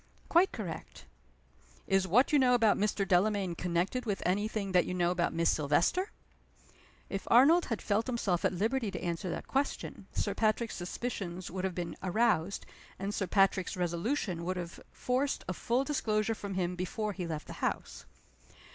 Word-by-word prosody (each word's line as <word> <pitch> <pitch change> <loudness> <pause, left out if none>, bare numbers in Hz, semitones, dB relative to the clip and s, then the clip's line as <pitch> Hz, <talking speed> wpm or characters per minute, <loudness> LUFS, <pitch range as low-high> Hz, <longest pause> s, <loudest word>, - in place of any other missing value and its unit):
"Quite 350 +3 +5
correct." 190 -7 -7 0.8
"Is 195 -1 +2
what 245 - +4
you 290 - +6
know 250 -2 +5
about 225 -3 +4
Mr. 200 -1 0
Delamayn 190 0 +2
connected 180 +8 -1
with 200 -2 -1
any 200 +4 +1
thing 205 -3 -3
that 180 -2 +3
you 180 - -2
know 175 -1 +2
about 175 -1 0
Miss 165 0 +2
Silvester?" 160 - +1 1.0
If 195 - -5
Arnold 295 +9 +6
had 230 -4 -3
felt 215 +3 +1
himself 210 -8 0
at - - +3
liberty 220 +5 0
to - - -5
answer 170 +1 -2
that - - -5
question, 275 +2 -2
Sir - - -1
Patrick's 220 +1 0
suspicions 185 -1 -4
would 185 +1 -3
have 185 -2 -2
been 170 -2 -4
aroused, 195 -2 +1 0.3
and 195 +2 -3
Sir 195 - -1
Patrick's 195 -1 +2
resolution 175 - -1
would 185 +2 -2
have 170 -1 -6
forced 260 +3 -1
a 185 - -1
full 240 +8 0
disclosure 225 -6 0
from 200 -3 -6
him 180 -1 -1
before 205 +4 -3
he 180 -3 -4
left 155 -2 -4
the - - -8
house. - - -3
195 Hz, 175 wpm, -31 LUFS, 180-230 Hz, 1.0 s, you